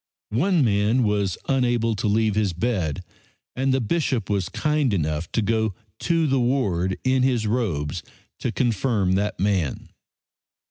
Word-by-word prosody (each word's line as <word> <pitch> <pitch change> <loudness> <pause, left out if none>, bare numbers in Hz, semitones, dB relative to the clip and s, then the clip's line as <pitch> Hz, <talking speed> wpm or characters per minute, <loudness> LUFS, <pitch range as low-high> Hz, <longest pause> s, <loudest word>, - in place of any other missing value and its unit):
One 160 - +2
man 105 +4 +2
was 100 -4 0
unable 120 -4 +1
to 110 - -1
leave 110 +1 +2
his 105 -3 0
bed, 90 - -1 0.5
and 135 +1 +1
the 130 - +2
Bishop 130 - -1
was 100 -3 0
kind 150 -7 +1
enough 80 -1 -2
to 115 - +1
go 110 -1 0 0.2
to 165 -1 +1
the 135 -2 +2
ward 100 -8 0
in 130 0 +2
his 125 -4 +1
robes 90 -9 -1 0.4
to 120 - -2
confirm 115 -5 +1
the 100 +3 0
man. 95 -8 -1
110 Hz, 145 wpm, -23 LUFS, 95-130 Hz, 0.5 s, One